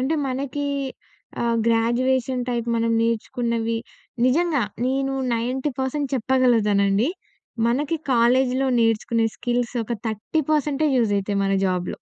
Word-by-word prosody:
అంటే 270 +5 0
మనకి 275 +2 -3 0.8
ఆహ్, 235 -1 +1
గ్రాడ్యుయేషన్ 245 +2 +1
టైప్ 235 -1 -1
మనం 230 0 +1
నేర్చుకున్నవి, 230 0 -1 0.5
నిజంగా 305 -1 +2 0.2
నేను 270 +1 0 0.2
90% 265 +3 -2
చెప్పగలుగుతానండి. 225 -3 +2 0.6
మనకి 285 +7 0 0.2
కాలేజీలో 255 +2 +3
నేర్చుకునే 225 0 +1
స్కిల్స్ 245 0 -1
ఒక 230 - -5
30 220 +9 -1
పర్సెంటే 300 0 +1
యూజ్ 225 -4 +2
అయితాయి, 200 0 -1
మన 195 - +1
జాబ్‌లో. 180 -1 -1
245 Hz, 110 wpm, -23 LUFS, 230-265 Hz, 0.8 s, కాలేజీలో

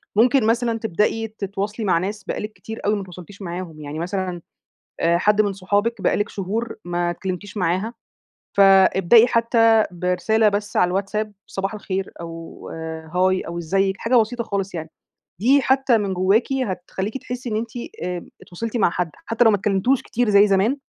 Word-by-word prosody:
ممكن 245 +3 +4
مثلًا 230 0 +1
تبدZي 220 +4 0
تتواصلي 200 +3 -3
مع 180 -4 +3
ناس 200 +4 -3
بقالِك 210 +2 -4
كتير 220 +1 -8
أوي 210 +1 +3
ما 205 - -3
إتواصلتيش 185 +2 -11
معاهم، 175 -3 -6
يعني 150 +2 -6
مثلًا 180 0 -3 0.6
آآ 170 +1 +3
حد 210 +3 +3
من 205 -2 +2
صحابِك 205 +4 -1
بقى - - +2
لِك 205 - 0
شهور 215 +4 -3
ما 175 0 -1
اتكلمتيش 185 +3 -5
معاها، 185 +5 0 0.6
فابدئي 195 +3 +6
حتى 230 -2 +4
برسالة 180 +5 +1
بس 205 0 -2
على 180 - +4
الواتساب، 200 +3 -2
صباح 195 +2 -3
الخير، 195 -2 -4
أو 165 -1 -9
آآ 160 -1 -7
هاي، 185 +1 +3
أو 170 +1 -6
إزيِك، 190 +3 0
حاجة 240 +2 +1
بسيطة 235 +1 +1
خالص 195 -3 -3
يعني، 160 -1 -5 0.5
دي 270 +5 +4
حتى 265 -3 +3
من 200 -2 -2
جواكِ 195 +8 +2
هتخليكِ 190 +4 -4
تحسي 250 -1 -6
إن 215 - -1
إنتِ 225 +1 -3 0.3
آآ 180 -1 -4 0.2
اتواصلتِ 230 +7 -5
مع 200 -6 +3
حد 175 -1 -2 0.2
حتى 230 +1 +2
لو 225 - +7
ما 205 - +3
اتكلمتوش 205 +6 +1
كتير 240 0 -1
زي 200 0 +6
زمان، 200 +8 +2
200 Hz, 170 wpm, -22 LUFS, 180-225 Hz, 0.6 s, لو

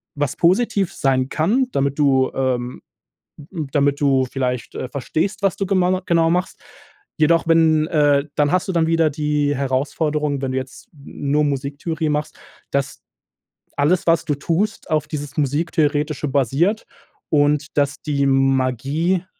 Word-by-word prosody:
was 145 -2 -2
positiv 190 +1 +2
sein 130 -1 0
kann, 220 - +1
damit 140 - -1
du 135 -3 +3
ähm, 125 -2 -2 0.9
damit 140 -1 +2
du 135 -2 +2
vielleicht, 125 -3 -3
äh, 130 - -4
verstehst, 160 +9 -2
was 195 -2 +1
du 195 - -1
gemana 185 -1 +1
genau 165 -1 +3
machst. 180 +2 -1 0.6
Jedoch 165 +2 +3
wenn 160 -2 +4
äh, 145 -3 +2
dann 145 +1 +2
hast 185 +1 0
du - - 0
dann 165 -2 +2
wieder 165 -1 +3
die 150 -1 0
Herausforderung, 145 +2 -1
wenn 130 -1 -2
du 130 - -1
jetzt 130 0 -9
n 140 0 -7
nur 150 +1 +3
Musiktheorie 145 +3 -2
machst, 150 0 -3 0.3
dass 140 0 -2 0.8
alles 160 +5 +2
was 165 -1 +3
du 145 - 0
tust 180 +9 -2
auf 155 -1 +1
dieses 145 -2 -6
Musiktheoretische 150 0 0
basiert 145 - +1 0.4
und 150 0 +1
dass 140 0 0
die 140 -2 0
Magie 135 +6 +1
150 Hz, 145 wpm, -20 LUFS, 140-165 Hz, 0.9 s, wenn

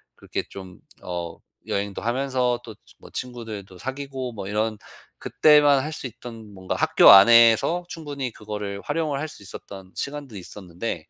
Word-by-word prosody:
그렇게 - - -5
좀 95 -2 -11 0.2
어 85 -2 -5 0.3
여행도 100 0 -3
하면서 125 0 0
또 110 - -9
지 - - -22
뭐 - - -14
친구들도 110 -7 -7
사귀고 130 -1 -5
뭐 100 -3 -7
이런 110 +1 -1 0.4
그때만 145 -3 +4
할 155 +1 -5
수 135 - -5
있던 115 -2 -11
뭔가 95 -1 -4
학교 - - +5
안에서 115 - +7
충분히 145 -7 -5
그거를 105 -2 -6
활용을 155 -4 -2
할 155 - -3
수 150 -10 -11
있었던 95 0 -10
시간도 140 -5 -5
있었는데 90 -1 -6
115 Hz, 320 characters per minute, -24 LUFS, 100-135 Hz, 0.4 s, 안에서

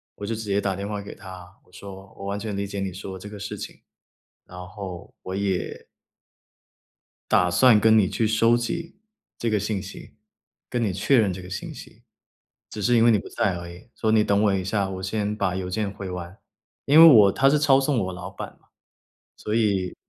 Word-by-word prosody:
我 100 - -7
就 115 +2 -2
直 110 - -6
接 100 0 0
打 95 -1 -1
电 100 +2 -5
话 105 -1 -4
给 100 - -10
他， 95 -2 -12
我 - - -27
说： 95 +1 -11
“我 100 - -8
完 100 +1 -3
全 105 -2 -4
理 100 0 -3
解 100 0 -5
你 95 -2 -3
说 95 0 -7
这 105 +3 -10
个 105 -1 -9
事 100 - -6
情， - - -9 0.6
然 90 - -13
后 95 -3 -8
我 95 - -6
也” 100 -2 -3 1.4
“打 90 -1 +3
算 115 +3 +6
跟 110 0 +5
你 95 - +3
去 115 - -1
收 115 +2 +3
集 165 +10 -4 0.4
这 115 - -1
个 105 -2 +1
信 105 -1 -3
息， 95 - -11 0.6
跟 120 -1 -2
你 100 -5 0
确 125 +8 +2
认 100 -4 +2
这 95 - -8
个 90 - -11
信 95 - -6
息， - - -13 0.7
只 105 - -7
是 120 +5 +2
因 115 - +5
为 120 - +6
你 110 - +4
不 - - -8
在 95 -3 -1
而 85 0 -7
已。 90 +6 -13
所 110 - -3
以 110 - +3
你 110 - +5
等 100 -1 +2
我 100 -2 +3
一 95 - -1
下， 100 +1 -1
我 95 -1 -6
先 105 +2 -2
把 95 -4 -1
邮 90 -1 -4
件 100 +1 -2
回 100 -2 -7
完。” 90 +2 -7 0.5
因 150 +3 +7
为 165 - +11
我 105 -10 +8
他 135 - +3
是 150 - +3
抄 135 -2 +4
送 135 -2 0
我 95 - -5
老 90 +1 -8
板 - - -9
嘛， - - -33 0.7
所 105 - -5
以 100 -5 0
100 Hz, 240 characters per minute, -24 LUFS, 95-110 Hz, 1.4 s, 为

